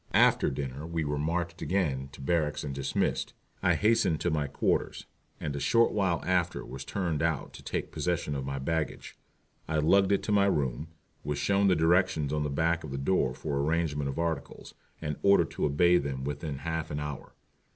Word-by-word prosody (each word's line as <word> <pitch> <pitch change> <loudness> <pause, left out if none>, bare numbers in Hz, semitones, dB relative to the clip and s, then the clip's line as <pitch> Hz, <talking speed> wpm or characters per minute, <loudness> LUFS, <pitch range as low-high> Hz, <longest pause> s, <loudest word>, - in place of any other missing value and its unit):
After - - +5
dinner 70 +2 -5
we 85 -1 -2
were 75 -1 -2
marched 85 +2 -2
again 70 -9 -1
to 70 - -11
barracks 75 0 0
and 70 - -4
dismissed. 70 0 -1 0.3
I - - +3
hastened 105 -7 +2
to 85 - +1
my 75 -2 0
quarters, 70 - -1 0.3
and 75 -2 -3
a - - -2
short 115 +10 +3
while 95 -5 0
after 90 -2 0
was 65 +2 -7
turned 85 -3 -2
out 80 -4 -1
to - - -10
take - - -3
possession 85 -4 -1
of 70 -1 -3
my 70 +1 -3
baggage. 75 +3 -3 0.5
I 80 - 0
lugged 95 +6 +4
it 100 - +2
to - - -2
my 100 -1 +4
room, 70 -4 0 0.4
was 75 0 -2
shown 100 0 +2
the 95 - +4
directions 80 -2 +2
on 75 - 0
the 75 - -1
back 85 +4 +1
of 75 - -6
the 70 - -4
door 70 -3 +1
for 70 0 -3
arrangement 75 -1 0
of 70 - -5
articles, 85 -1 -3 0.3
and 75 -2 -3
ordered 100 0 +4
to - - -1
obey 85 +5 +4
them 70 -2 -4
within 70 +1 -4
half 80 -1 -2
an 75 - -3
hour. 75 -2 -6
80 Hz, 195 wpm, -29 LUFS, 70-85 Hz, 0.5 s, After